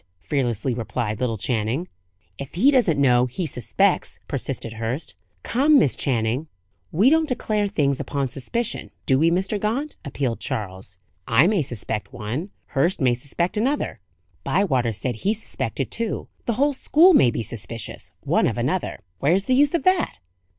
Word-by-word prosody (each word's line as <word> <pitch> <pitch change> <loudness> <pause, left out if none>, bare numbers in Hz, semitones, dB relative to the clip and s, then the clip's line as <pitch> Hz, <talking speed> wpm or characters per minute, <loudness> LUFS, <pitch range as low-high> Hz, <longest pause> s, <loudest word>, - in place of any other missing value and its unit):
fearlessly 125 - -1
replied 115 -2 -3
little 120 -3 -1
Channing. 115 - -1 0.5
"If 140 +2 -7
he 250 +11 +5
doesn't 210 - +3
know, 125 -2 +4
he 130 +9 -4
suspects," 125 -6 0
persisted 115 - -4
Hurst. 115 +7 -4 0.3
"Come, 285 +6 +4
Miss 145 - +4
Channing." 125 +3 -1 0.4
"We 210 - +4
don't 320 -1 +3
declare 215 -4 0
things 145 -9 0
upon 140 -2 -2
suspicion, 230 - -3 0.2
do 130 -1 +3
we, 165 +2 +4
Mr. 190 +4 0
Gaunt?" 245 +9 -2
appealed 135 -4 -2
Charles. 95 -3 -5 0.3
"I 115 +7 +5
may 200 -2 +3
suspect 110 -5 -3
one; 125 - -4 0.2
Hurst 170 +8 +1
may 130 -4 +3
suspect 170 - -2
another; 250 - 0 0.4
Bywater 130 - +1
said 110 +2 -3
he 205 - 0
suspected 220 - -3
two; 230 -2 -3 0.2
the 235 - +2
whole 285 +5 +2
school 330 +7 +5
may 130 - +6
be 115 - -2
suspicious, 115 +1 -6
one - - +2
of - - -2
another. - - -1 0.2
Where's 175 +8 +2
the 255 - +2
use 285 +5 +4
of 340 - 0
that?" 370 - +2
140 Hz, 155 wpm, -23 LUFS, -, 0.5 s, may